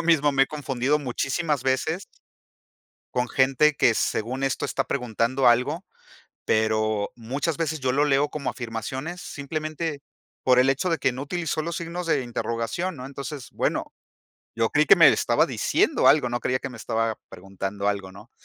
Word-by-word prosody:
yo - - -2
mismo 150 -4 +3
me 135 0 +4
he - - -14
confundido 140 -1 -1
muchísimas 140 +2 -1
veces 155 +8 0 1.1
con 125 -1 0
gente 135 +3 +3
que 115 - +4
según 125 +6 -1
esto 135 - -1
está - - -1
preguntando 125 +2 +1
algo, 140 +9 +2 0.6
pero, 110 -1 +1
muchas 135 +7 -3
veces 160 -2 -1
yo 130 -1 0
lo 145 +3 +2
leo 145 +1 +2
como 145 -3 -3
afirmaciones 130 +9 -5
simplemente 155 +1 -4 0.4
por 125 -1 +5
el 130 +1 +4
hecho 140 +7 0
de 165 - 0
que 135 - +2
no 130 +3 -5
utilizó 165 0 -2
los 170 +1 -3
signos 170 +1 -5
de 160 - +1
interrogación, 120 +9 -3
¿no? 125 - -7
Entonces, 140 -2 -7
bueno - - -2 0.6
yo 115 -1 +2
creí 150 +1 +4
que - - +7
me - - +8
estaba - - +3
diciendo - - +2
algo 145 -5 +5
no 120 0 -2
creía 130 0 0
que 140 - -6
me 125 - -10
estaba 115 0 -1
preguntando 95 +2 -5
algo, 100 -2 -2
¿no? 105 +4 -14
135 Hz, 170 wpm, -25 LUFS, 120-150 Hz, 1.1 s, me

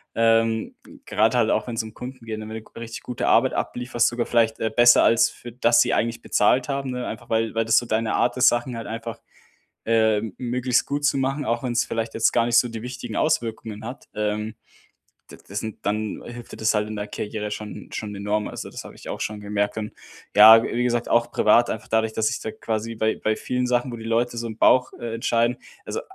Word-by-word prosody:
Ähm, 115 0 +2 0.3
grade 115 +3 +2
halt 115 -2 +3
auch, 110 - +1
wenn's 115 -2 -2
um 110 -1 -10
Kunden 125 -1 -9
geht, 110 -1 -4
ne, 110 - -7
wenn 110 - -7
du 110 - -7
'ne 115 - -13
richtig 115 0 -7
gute 125 - -3
Arbeit 130 +3 +4
ablieferst, 120 -1 0
sogar 120 0 -1
vielleicht, 115 -2 +1
äh, 110 - 0
besser 120 +2 +6
als 115 0 +4
für 120 - -11
das 120 0 +4
sie - - +2
eigentlich 115 +1 -1
bezahlt 125 +5 +2
haben, 135 -1 -2
ne? 125 -1 -4
Einfach 115 +2 -7
weil 115 0 0
weil 115 0 +1
das 115 0 +4
so 120 - +2
deine 110 0 0
Art 125 +1 +1
ist, 125 - +5
Sachen 120 +1 -2
halt 115 - -6
einfach, 115 +1 -6 0.7
äh, 110 -2 +3 0.2
möglichst 125 0 0
gut 145 +1 -2
zu 140 - +2
machen, 135 +2 -1
auch 120 +2 -1
wenn's 120 -2 0
vielleicht 115 0 -3
jetzt 115 - +3
gar 115 - +3
nicht 120 0 +3
so 125 - +4
die 115 -1 -6
wichtigen 125 -3 -6
Auswirkungen 115 -7 -1
hat. 125 +4 -8
Ähm, 105 +1 -2 0.8
d - - -11
das 100 +2 -4
sind 110 -2 -8
dann 105 +1 -2
hilft 120 0 -9
dir - - -8
das 110 0 +1
halt 105 0 0
in 110 - -5
der 105 - -4
Karriere 105 0 -5
schon 105 0 -7
schon 105 -2 -5
enorm. 105 +1 -1
Also - - -7
das - - -8
habe - - -12
ich - - -13
auch - - -5
schon 105 0 -3
gemerkt 105 +1 -1
und 105 -1 -4 0.4
ja, 110 +2 +10
w - - -3
wie 120 - +1
gesagt, 120 -1 0
auch 120 0 +2
privat 120 +2 +4
einfach 110 - -5
dadurch, 110 0 +1
dass 110 0 +1
sich 115 - -1
da 110 - -4
quasi 110 +1 -4
bei 110 0 0
bei 110 0 +2
vielen 125 0 -2
Sachen, 125 +1 0
wo - - -5
die 115 - -9
Leute 115 +1 0
so 115 0 -3
im 110 - -8
Bauch, 125 +2 +4
äh, 120 -1 -5
entscheiden 115 +1 +1 0.3
also - - -4
115 Hz, 235 wpm, -23 LUFS, 110-120 Hz, 0.8 s, ja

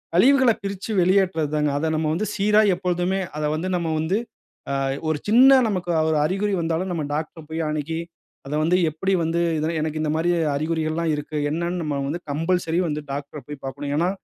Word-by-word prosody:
கழிவுகள 260 +5 +5
பிரிச்சு 200 +2 -4
வெளியேற்றது 180 -4 +2
தாங்க. 150 -1 +1
அத 160 +2 -1
நம்ம 155 0 0
வந்து 205 +6 -1
சீரா 210 +2 +4
எப்பொழுதுமே 180 +1 -1 0.2
அத 150 - -2
வந்து 175 +4 -3
நம்ம 165 -2 -2
வந்து. 165 +6 0 0.5
ஆ - - -1 0.3
ஒரு 155 -1 +1
சின்ன 260 +5 +7
நமக்கு 185 -4 -2 0.2
ஒரு 155 - +2
அறிகுறி 195 +4 0
வந்தாலும் 165 +3 -1
நம்ம 165 -3 -2
டாக்டர் 155 +2 -4
அ - - -17
போய் 160 +1 -3
அணுகி, 155 +2 -2 0.5
அத 145 - -5
வந்து 175 +3 +3
எப்டி 190 +6 -1
வந்து 165 +1 0 0.4
எனக்கு 155 0 -2
இந்த 155 -1 0
மாரி 170 +2 +1 0.2
அறிகுறிகள்லாம் 160 +1 -1
இருக்கு. 150 +1 -5
என்னன்னு 170 +2 -2
நம்ம 145 -2 -2
வந்து 170 +3 -3
கம்பல்சரி 165 +2 0
வந்து 150 0 -3
டாக்டர் 145 +1 -6
அ - - -26
போய் 145 -1 -9
பார்க்கணும். 140 +2 -4
ஏனா, 175 +3 +2
165 Hz, 185 wpm, -23 LUFS, 155-185 Hz, 0.5 s, சின்ன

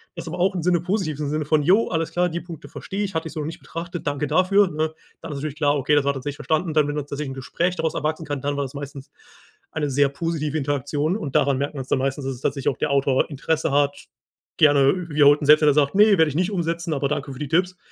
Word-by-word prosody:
das - - -7
aber - - -5
auch 190 +2 +2
im 175 - -1
Sinne 175 -1 +2
positivem 165 -6 -2
Sinne 155 0 -1
von: 150 0 +2
„Jo, 195 +9 +4
alles 165 -1 -1
klar, 180 0 +1
die 170 +1 -4
Punkte 165 -2 -10
verstehe 195 +2 -5
ich. 195 -4 -5
Hatte 160 0 -1
ich - - -11
so - - -5
noch - - -4
nicht 160 - -7
betrachtet. 170 +1 -7
Danke 145 +1 -1
dafür“, 195 +4 +3
ne? 155 0 -2 0.3
Dann 165 - -7
ist 145 - -5
natürlich 150 0 -4
klar: 145 -1 +2
Okay, 140 +2 +2
das 145 - +3
war 140 - +3
tatsächlich 140 +1 -5
verstanden. 155 +3 -1
Dann, 155 -2 +3
wenn 145 - -3
tatsächlich 145 0 -4
'n - - -5
Gespräch 170 +7 -2
daraus 160 -1 -1
erwachsen 155 +2 -2
kann, 145 -2 -4
dann 145 +1 -2
war 140 - 0
das 130 - -9
meistens 140 -1 -8 0.6
eine 150 -2 -2
sehr 140 +1 +3
positive 155 0 -2
Interaktion. 145 +3 -1
Und 145 -11 -6
daran 140 -1 +2
merkt 140 +2 -3
man's 135 -2 -5
dann - - +2
meistens, 135 +1 -2
dass 135 -1 -3
es 120 - -14
tatsächlich 140 -1 -2
auch - - -18
der - - 0
Autor 140 0 +2
Interesse 155 +2 -1
hat. 140 0 0 0.5
Gerne 145 +4 +4
wiederholt 145 -1 +5
und - - -2
selbst, 150 +1 +7
wenn 150 - +5
er 145 - +4
sagt: 145 0 +2
„Ne, 205 0 +6
werde 160 -1 +5
ich 145 - -4
nicht 180 +4 +1
umsetzen, 170 -2 -2
aber 140 -1 0
danke 145 0 -3
für 130 - -11
die 150 - -3
Tipps.“ 180 +2 +1
150 Hz, 270 wpm, -23 LUFS, 140-165 Hz, 0.6 s, selbst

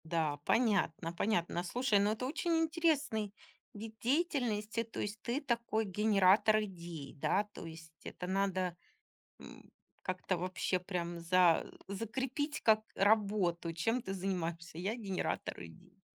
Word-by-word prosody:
Да, 160 -3 0
понятно, 190 -8 +2
понятно. 175 -3 0
Слушай, 215 +3 +2
ну, 205 +1 +3
это 220 +4 -2
очень 330 +5 -1
интересный 315 - +1 0.4
вид 220 +1 -8
деятельности. 240 -6 +1
То 225 - -8
есть, 210 +2 -3
ты 250 +5 -1
такой 235 -4 0
генератор 210 +1 +4
идей, 170 -7 -7
да? 195 +8 +2
То - - -8
есть, 160 0 -10
это 180 - -6
надо, 185 -2 0 0.6
м, - - -13 0.3
как-то 185 0 -1
вообще 185 +1 0
прям 175 -2 -3
за 175 -1 +4 0.2
закрепить 260 +8 -2
как 215 -1 +5
работу. 195 -5 +2
Чем 225 +10 0
ты 195 - -4
занимаешься? 170 -3 -3
Я- 195 +5 -1
генератор 195 - -3
идей. 80 -2 -15
200 Hz, 130 wpm, -34 LUFS, 175-225 Hz, 0.6 s, как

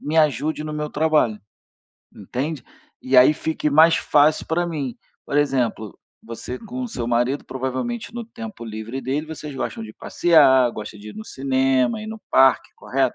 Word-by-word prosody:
me 155 +2 -3
ajude 150 +1 +1
no 155 - -5
meu 150 0 -4
trabalho". 150 -8 +1 0.7
Entende? 130 - -4 0.4
"E 130 0 +1
aí 125 +4 +8
fique 160 -1 -2
mais 160 +3 +6
fácil 150 +1 +3
para 175 +2 0
mim". 145 -7 -4 0.3
Por 145 - -2
exemplo, 125 -8 0 0.2
você 115 +2 -7
com 250 +3 -6
o 250 - -4
seu 120 - -4
marido, 120 +4 0
provavelmente, 130 - -4
no 240 -1 -5
tempo 225 - -9
livre 110 +3 -6
dele, 135 +5 -2
vocês 150 -2 -7
gostam 115 -3 -4
de 110 - -10
passear, 135 -7 +4
gostam 105 0 -8
de 105 +1 -10
ir - - -13
no 220 - -8
cinema, 135 - 0
ir 215 - -7
no 220 0 -7
parque, 135 0 +4
correto? - - -1
140 Hz, 175 wpm, -22 LUFS, 125-160 Hz, 0.7 s, aí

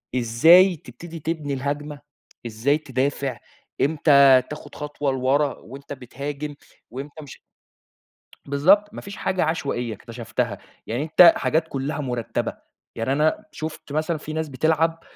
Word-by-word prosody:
إزاي 160 +11 +6
تبتدي 165 +6 -10
تبني 155 -2 -3
الهجمة، 145 +2 -4 0.5
إزاي 120 +6 +1
تدافع، 135 -3 -2 0.4
إمتى 140 -3 +6
تاخد 150 - -9
خطوة 145 -1 -3
لورا 135 +2 +1
وأنتَ 140 +4 -10
بتهاجم؟ 140 +3 -6 0.4
وإمتى 145 +4 -8
مش 135 - -12 1.1
بالضبط، 195 +10 +3
ما - - -6
فيش 200 +1 -9
حاجة 185 - 0
عشوائية 125 -8 -2
اكتشفتها، 115 +2 -4 0.3
يعني 120 +6 -2
أنتَ 165 +2 +7
حاجات 160 +1 0
كلّها 140 +2 -3
مرتبة، 125 -5 -3 0.4
يعني 115 +3 -1
أنا 155 +2 +1
شُفت 155 -2 -7
مثلًا 155 +2 0
في 155 +1 -7
ناس 160 0 -2
بتلعب 160 +4 +1
145 Hz, 125 wpm, -23 LUFS, 130-155 Hz, 1.1 s, أنتَ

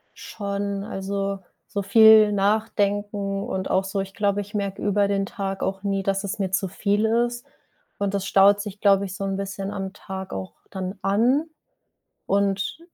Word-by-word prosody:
Schon, 200 -1 -4
also, 195 0 -3 0.3
so 200 - -2
viel 215 +1 +7
nachdenken 205 -1 0
und 190 0 -3
auch 190 - +2
so 195 +1 -3
ich 195 0 -4
glaube, 205 -1 0
ich 205 +1 -11
merke 200 -2 -3
über 205 0 +2
den 195 -1 +1
Tag 195 -3 -4
auch 195 +1 -2
nie, 195 -1 0
dass 195 +1 -1
es 200 +1 -4
mir 190 -2 0
zu 190 0 0
viel 205 +3 0
ist. 240 +2 0 0.5
Und 200 -1 -1
das 195 -1 -1
staut 200 +1 +5
sich 205 -1 -8
glaube 200 -1 +4
ich 190 0 -6
so 195 -1 -4
'n 195 0 -1
bisschen 195 0 -4
am 190 -1 -4
Tag 190 -2 -7
auch 95 -1 -5 0.2
dann 190 0 -5
an. 240 +10 +2 0.8
Und, 200 +6 0
200 Hz, 175 wpm, -24 LUFS, 195-205 Hz, 0.8 s, viel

